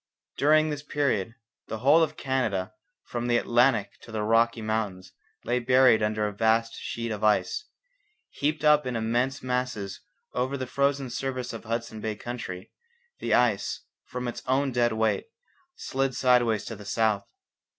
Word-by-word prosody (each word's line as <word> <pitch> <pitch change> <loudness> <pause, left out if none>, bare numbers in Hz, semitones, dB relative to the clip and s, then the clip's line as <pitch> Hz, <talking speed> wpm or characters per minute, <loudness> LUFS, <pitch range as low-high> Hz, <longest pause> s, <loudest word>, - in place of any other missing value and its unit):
During 155 +2 +4
this 145 -1 -4
period 135 -7 -1 0.3
the 110 - -4
whole 140 +8 +5
of 155 0 0
Canada 110 - -1 0.3
from 120 0 -4
the 120 -1 +3
Atlantic 120 -2 +2
to 115 - -13
the 110 -1 -2
Rocky 115 +2 +3
Mountains 100 -4 -2 0.3
lay 125 +1 0
buried 125 -2 +5
under 105 0 0
a 105 - -5
vast 115 +2 +2
sheet 115 -1 -4
of 105 0 -4
ice. 110 - +2 0.7
Heaped 150 +2 -1
up 150 -2 +5
in 125 - -2
immense 120 +4 0
masses 125 -7 -2 0.3
over 130 +3 -1
the 130 - -3
frozen 140 0 0
surface 130 -1 -3
of 115 - -6
the - - -17
Hudson 115 -1 -3
Bay 110 0 -2
country, 105 -6 -7 0.5
the - - +1
ice, 110 -5 +1 0.2
from 125 0 -5
its 120 0 -5
own 135 +1 +2
dead 120 -1 +2
weight, 110 - 0 0.5
slid 135 -1 -2
sidewise 120 -4 +3
to 115 - -6
the 105 - -11
south. 105 -1 +1
120 Hz, 160 wpm, -27 LUFS, 110-130 Hz, 0.7 s, whole